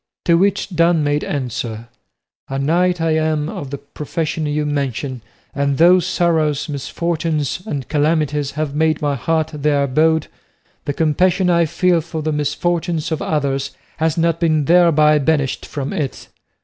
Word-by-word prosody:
To 170 - +4
which 195 +4 +1
Don 170 -1 +3
made 145 0 0
answer, 120 -4 -4 0.6
"A 135 - -3
knight 175 +5 +1
I 165 0 +1
am 155 -1 0
of 145 -4 -6
the 140 - -5
profession 150 +2 -4
you 150 0 -1
mention, 140 -3 -3 0.3
and 140 -1 0
though 175 +4 +6
sorrows, 165 -5 0
misfortunes, 155 +1 -2
and 140 -9 -4
calamities 150 -2 0
have 150 -1 -3
made 155 +1 +1
my 145 -1 0
heart 160 +4 -1
their 145 -1 +1
abode, 155 +3 +2 0.6
the 145 - -1
compassion 180 +4 +2
I 170 -1 +3
feel 175 +1 +2
for 160 -1 -6
the 155 - -1
misfortunes 165 +2 -1
of 160 - -2
others 140 -2 -1 0.2
has 160 +1 0
not 165 0 +1
been 155 -3 +2
thereby 155 -2 +5
banished 145 -2 0
from 140 -2 -4
it. 140 -4 -4
155 Hz, 150 wpm, -19 LUFS, 145-165 Hz, 0.6 s, though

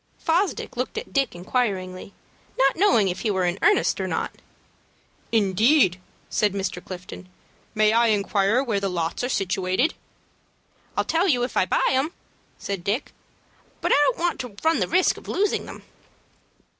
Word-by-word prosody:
Fosdick 350 +4 -1
looked - - -3
at 450 - -6
Dick, 275 -9 +1
inquiringly, 185 -2 -2 0.5
not 270 0 +3
knowing 240 - +4
if 180 0 -2
he 225 - -1
were 190 -3 +1
in 175 +2 -1
earnest 420 - +3
or - - -2
not. - - -2 1.0
"Indeed!" 210 - +3 0.3
said 210 -2 +1
Mr. 195 -1 -3
Clifton. 185 0 -9 0.5
"May 215 0 +4
I 235 +1 +4
inquire 205 +2 +2
where 225 -6 -1
the 195 0 -1
lots 170 +3 -2
are 250 - -1
situated?" 190 - 0 1.0
"I'll - - +3
tell 335 +4 +1
you 250 -8 +2
if 245 - -3
I 185 - +2
buy - - +1
them," 270 +5 0 0.4
said 195 -3 -5
Dick; 210 +9 -2 0.7
"but - - -1
I - - +6
don't - - +1
want 345 0 -1
to 245 -5 -6
run 320 +1 +3
the - - 0
risk 365 +2 +2
of - - -13
losing 410 +1 0
them." - - -10
215 Hz, 165 wpm, -24 LUFS, 190-275 Hz, 1.0 s, I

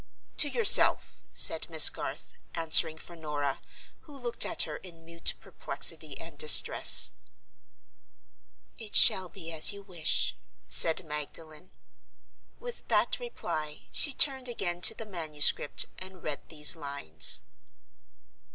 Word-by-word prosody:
"To 290 - +5
yourself," 460 +6 +2
said - - -1
Miss - - +5
Garth; - - -10 0.2
answering 160 -1 +1
for 170 +2 -14
Norah, 150 -4 -6 0.4
who 290 -3 -17
looked 245 -3 -1
at - - 0
her - - -8
in 165 -3 -17
mute 170 0 -5
perplexity - - -3
and - - -13
distress. 460 - +7 1.7
"It 220 -2 -9
shall 185 -1 +5
be 165 -1 -12
as 160 -1 +2
you 200 0 -12
wish," 175 -5 -3 0.3
said 165 +2 +2
Magdalen. 155 +3 -9 0.9
With 485 0 -11
that - - -1
reply, 155 - -8
she 290 - +2
turned 265 -1 +1
again 175 -7 -5
to 220 - +2
the 225 - -10
manuscript 155 -7 -1
and 185 -1 -11
read 150 -2 -8
these 150 +1 0
lines 140 - -2
170 Hz, 125 wpm, -26 LUFS, 155-210 Hz, 1.7 s, distress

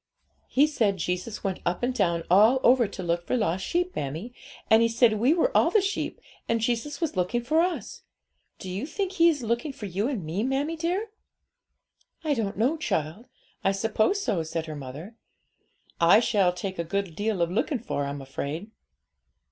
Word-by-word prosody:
'He 280 +3 +4
said 225 -10 +1
Jesus 180 +5 -3
went 195 -2 -2
up 175 +5 -1
and 250 +1 +1
down 170 -8 +1
all 215 +8 +5
over 245 -2 +5
to 190 - -7
look 170 0 0
for 255 - +1
lost 190 -4 0
sheep, 355 - -1
mammie; 160 - -4 0.3
and 220 +1 +6
he 230 - +5
said 230 -2 +3
we 245 +6 +4
were 345 +9 +2
all - - +5
the 435 - +4
sheep, 400 +1 -2 0.3
and 230 0 +2
Jesus 240 +5 -1
was 330 -8 -2
looking 185 +7 0
for 315 +7 +3
us. 360 0 -3 0.6
Do - - -9
you 195 +9 -4
think 380 +4 -2
He 340 -3 +5
is 290 -6 -1
looking 235 +6 -1
for 230 - -8
you 195 +4 -1
and 235 - -3
me, 165 +6 -2
mammie 275 +6 -1
dear?' 360 +7 -2 1.1
'I 305 -2 +1
don't 215 -6 -2
know, 255 +9 +2
child; 165 - -2 0.4
I 195 - +3
suppose 220 - +1
so,' 205 - 0
said 160 0 -3
her 155 -1 -6
mother. 145 - -9 0.8
'I 170 +5 +7
shall 200 -6 +3
take 185 +1 -5
a - - +1
good 190 0 -3
deal 210 0 -1
of 170 0 +1
looking 230 +8 0
for, 205 - -3
I'm 140 0 -5
afraid.' 150 +9 -5
220 Hz, 190 wpm, -26 LUFS, 180-270 Hz, 1.1 s, I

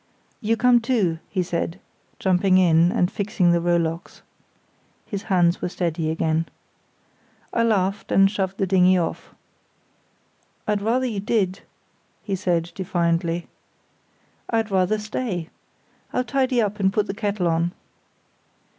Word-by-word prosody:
"You 225 0 0
come 245 0 +4
too," 215 -10 0
he 185 -2 -1
said, 170 +1 -3 0.4
jumping 185 0 +3
in, 170 -1 +4
and 180 0 +1
fixing 195 -3 +1
the 170 0 +2
rowlocks. 170 -1 -1 0.8
(His 200 -2 -5
hands 175 -2 +3
were - - -1
steady 165 -3 -2
again.) 160 0 0 1.1
I 230 - +2
laughed, 200 -3 0
and 195 - +6
shoved 195 -1 -2
the 195 - +1
dinghy 185 0 +4
off. 170 -2 -4 1.3
"I'd 210 -1 0
rather 240 +5 +1
you 220 -5 -2
did," 195 -2 0 0.6
he 195 - -2
said, 175 -3 -1
defiantly. 170 -2 -1 1.0
"I'd 225 -2 0
rather 190 +2 +2
stay. 210 -5 -4 0.6
I'll 250 - +1
tidy 255 -2 +1
up, 210 0 -3
and 190 -1 +3
put 210 0 +1
the 195 - -4
kettle 200 -3 -1
on." 170 +1 +1
190 Hz, 130 wpm, -23 LUFS, 175-210 Hz, 1.3 s, and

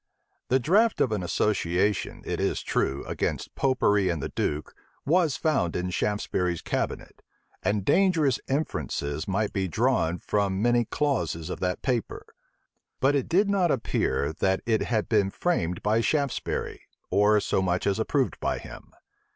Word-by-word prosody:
The 130 - +3
draught 200 - +3
of 125 - +2
an 105 -3 -1
association, 90 +1 0
it - - -3
is - - -1
true, 70 +1 -1
against - - -3
Popery 105 -8 +2
and 85 -2 -1
the - - -4
duke, 75 +1 -2 0.3
was 165 -1 +2
found 135 - 0
in 90 0 -2
Shaftesbury's 90 -4 -1
cabinet; - - -3 0.4
and 100 -2 0
dangerous 165 -9 +3
inferences 85 - -2
might 100 +2 -1
be 95 -2 0
drawn 110 -4 +1
from 100 0 -1
many 120 +2 +3
clauses 85 - -1
of - - -5
that 90 -1 -2
paper. 125 -5 -2 0.7
But 135 +2 +3
it 140 -2 0
did 195 +4 +3
not 195 -3 +2
appear, 95 - 0
that 95 0 +1
it 110 -2 +1
had 110 -3 0
been 105 -4 +2
framed 90 - -1
by 110 +2 +2
Shaftesbury, 140 +1 -1 0.3
or 105 +1 +4
so 95 - 0
much 90 -1 0
as 100 -1 +1
approved - - 0
by - - -1
him. - - -11
105 Hz, 150 wpm, -26 LUFS, 90-135 Hz, 0.7 s, or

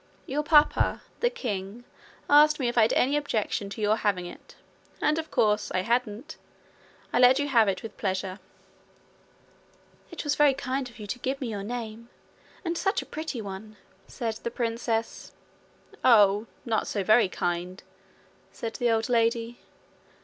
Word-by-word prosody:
'Your 285 +3 -1
papa, 300 -1 +3 0.2
the 485 - +2
king, 215 - -5 0.4
asked 300 +1 +6
me 255 - 0
if 240 - -2
I 235 - +5
had 220 - +3
any 275 +3 +2
objection 220 -8 -1
to 215 - -7
your 210 +1 +2
having 195 -5 0
it; 175 - -12 0.4
and, 305 +1 +1
of 320 -1 -6
course, 210 -1 +1
I 185 - +2
hadn't. 235 +5 -2 0.8
I - - +3
let 250 +1 +7
you 285 0 0
have 235 -6 +4
it 190 -2 -1
with 220 -2 -9
pleasure.' 190 0 -2 1.7
'It 340 - -6
was 290 -2 +1
very 290 -2 +4
kind 265 -1 -3
of 235 - -17
you 210 - -8
to 205 +5 -5
give 265 +2 -2
me 255 - -3
your 205 -2 -4
name 230 +1 -6 0.6
and 335 0 -1
such 390 +2 0
a - - -16
pretty 305 -7 -5
one,' 205 +2 -8 0.3
said 230 -4 -3
the 235 - -4
princess. 230 -1 -3 0.7
'Oh, 210 -2 +5 0.2
not 225 -3 0
so 200 - -2
very 215 0 +4
kind!' 175 +1 -3 0.7
said 225 -1 -6
the 245 - +1
old 225 -1 +1
lady. 230 0 0
230 Hz, 165 wpm, -27 LUFS, 210-265 Hz, 1.7 s, let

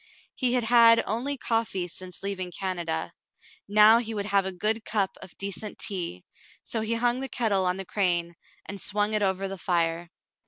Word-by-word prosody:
He 250 -2 0
had 250 -1 +2
had 230 0 +6
only 255 +7 -1
coffee 225 -7 -1
since 180 +1 -8
leaving 190 -2 -3
Canada; 175 - -3 0.6
now 215 +2 +7
he 225 -2 -4
would 200 -1 -3
have 200 -2 +2
a - - -3
good 215 +5 -1
cup 200 -4 -1
of 185 - -12
decent 200 +1 -5
tea, 170 - -2 0.4
so 225 - -3
he 220 +1 -1
hung 240 +2 +1
the 270 0 -3
kettle 200 -6 +1
on 180 +1 0
the 195 - -6
crane 175 -3 0 0.3
and 200 -1 -7
swung 210 +1 0
it 215 - +1
over 195 -1 0
the 195 -1 -6
fire. 170 -1 0
200 Hz, 185 wpm, -26 LUFS, 185-225 Hz, 0.6 s, now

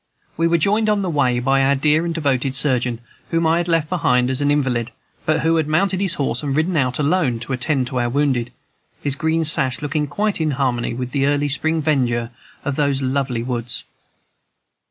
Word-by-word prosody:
We 165 +1 +1
were 170 0 +3
joined 210 +6 +2
on 210 -1 +1
the 180 - -1
way 130 -5 +2
by 135 +2 +2
our 140 +1 +3
dear 150 +4 +2
and 170 - -1
devoted 135 -4 0
surgeon, 125 -4 0 0.3
whom 165 0 +1
I 160 +1 +3
had 175 - -2
left 165 -3 +1
behind 125 -8 +1
as 130 +2 -1
an 145 - +2
invalid, 130 -5 0 0.4
but 155 0 +2
who 165 +2 +2
had 155 -2 0
mounted 185 +5 +1
his 190 -2 +1
horse 140 - -1
and 140 -2 -2
ridden 165 +4 +1
out 125 -4 +1
alone 150 -4 +1
to 125 +3 -4
attend 130 +1 0
to 130 - -2
our 120 0 0
wounded, 130 -3 0 0.5
his 140 -2 0
green 160 +2 0
sash 135 -4 +2
looking 150 0 -2
quite 205 +4 -1
in 155 - +1
harmony 120 -4 -1
with 125 0 -4
the 140 -1 +1
early 145 0 +1
spring 160 +2 0
verdure 120 -6 0 0.3
of 140 -1 -2
those 140 -2 +1
lovely 130 -3 -1
woods. 120 -1 -3
145 Hz, 205 wpm, -20 LUFS, 130-160 Hz, 0.5 s, were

